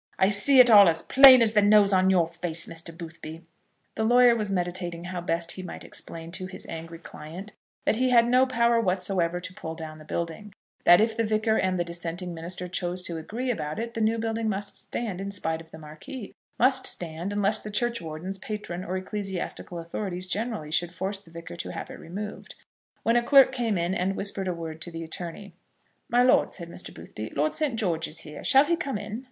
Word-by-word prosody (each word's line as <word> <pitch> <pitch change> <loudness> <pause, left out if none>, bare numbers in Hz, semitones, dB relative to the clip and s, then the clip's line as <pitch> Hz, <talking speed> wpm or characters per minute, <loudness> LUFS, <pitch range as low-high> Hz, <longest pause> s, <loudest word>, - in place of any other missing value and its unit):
I 190 - +4
see 255 +7 +7
it 245 -2 +8
all 200 -4 +9
as 165 0 0
plain 260 -2 +8
as 220 -1 +4
the 210 - +5
nose 205 -1 +5
on 190 0 +4
your 175 -3 +3
face, 170 -1 +2
Mr. 165 +1 -2
Boothby." 165 -1 -9 0.5
The 220 - -2
lawyer 240 +1 +5
was 215 -3 -2
meditating 175 -2 -2
how 180 0 -5
best 170 0 -1
he 185 - -6
might 180 - -8
explain 165 0 -7
to 185 +1 -5
his 185 - -9
angry 165 +1 -8
client 170 +5 -10 0.3
that - - +2
he 255 +1 +2
had 235 -1 +5
no 255 +2 +4
power 235 -2 +2
whatsoever 180 -3 0
to 180 +1 -8
pull 160 -2 -7
down 155 -1 -8
the - - -12
building, 170 +6 -5 0.3
that 175 +3 +7
if 220 0 +1
the 230 - 0
Vicar 220 0 +1
and 185 -3 0
the - - +2
dissenting 170 +1 -5
minister 175 +2 -4
chose 180 0 -2
to 170 -2 -3
agree 240 +10 -3
about 150 -8 -4
it 230 +1 -4
the 225 - -3
new 220 +1 +2
building 225 0 -2
must 200 0 -4
stand, 205 -6 -5
in 200 - -4
spite 165 -5 -3
of 165 - -16
the 160 - -11
Marquis, 160 - -10 0.2
must 260 +2 +3
stand, 170 +2 -3
unless 205 +1 +2
the 215 - -8
churchwardens, 195 -5 -3
patron, 195 -4 -6
or 185 +1 -3
ecclesiastical 190 -2 -5
authorities 180 +2 -5
generally 200 -4 -4
should 175 +2 0
force 190 +2 -2
the 195 - -18
Vicar 165 - -9
to - - -5
have - - -7
it - - -10
removed, 205 +5 -8 0.5
when 230 - +2
a 240 - +4
clerk 270 +2 +6
came 235 -6 -1
in 170 +2 -1
and 190 +1 -1
whispered 195 -1 -2
a 180 - -1
word 160 -1 -7
to 175 - -5
the 165 -1 -7
attorney. 175 +4 -6 0.6
"My 245 +1 +4
lord," 250 - +3
said 170 -3 -8
Mr. 180 - -5
Boothby, 110 +1 -9
"Lord 150 +2 +1
St. 295 -6 +1
George 170 -7 -1
is 160 +2 -1
here. 150 - -9
Shall 270 +2 +5
he 340 - +1
come 275 -8 -3
in?" 215 +2 -6
185 Hz, 215 wpm, -26 LUFS, 170-220 Hz, 0.6 s, all